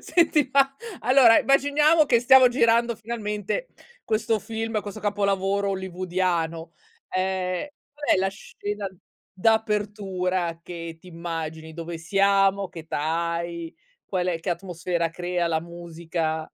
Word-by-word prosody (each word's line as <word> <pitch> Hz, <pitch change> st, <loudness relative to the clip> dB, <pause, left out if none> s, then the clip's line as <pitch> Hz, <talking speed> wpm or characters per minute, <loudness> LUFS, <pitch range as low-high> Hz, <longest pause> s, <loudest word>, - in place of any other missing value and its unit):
Senti 315 Hz, -5 st, +2 dB
ma, 275 Hz, -1 st, +4 dB, 0.3 s
allora, 250 Hz, -1 st, +6 dB
immaginiamo 295 Hz, +3 st, +4 dB
che 235 Hz, -3 st, +4 dB
stiamo 255 Hz, +1 st, +7 dB
girando 235 Hz, -2 st, +2 dB
finalmente 220 Hz, -, -3 dB, 0.4 s
questo 220 Hz, 0 st, +1 dB
film, 225 Hz, 0 st, -3 dB
questo 205 Hz, +1 st, -8 dB
capolavoro 200 Hz, -1 st, 0 dB
hollywoodiano, 180 Hz, -3 st, -2 dB, 0.4 s
ehm, 185 Hz, +2 st, -1 dB, 0.3 s
qual 290 Hz, 0 st, -8 dB
è -, -, +1 dB
la 190 Hz, 0 st, +2 dB
scena 205 Hz, +1 st, -6 dB, 0.5 s
d'apertura 195 Hz, -4 st, 0 dB
che 170 Hz, -2 st, -7 dB
t'immagini, 165 Hz, -2 st, -6 dB
dove 165 Hz, 0 st, -6 dB
siamo, 195 Hz, +2 st, +2 dB
che 175 Hz, -2 st, -9 dB
età 160 Hz, +2 st, -1 dB
hai, 170 Hz, -1 st, -5 dB, 0.3 s
qual 185 Hz, -2 st, -2 dB
è 165 Hz, -2 st, -1 dB
che 180 Hz, -, -3 dB
atmosfera 170 Hz, -1 st, -2 dB
crea 175 Hz, 0 st, -2 dB
la 160 Hz, -1 st, 0 dB
musica? 165 Hz, -1 st, -4 dB
190 Hz, 120 wpm, -25 LUFS, 170-220 Hz, 0.5 s, stiamo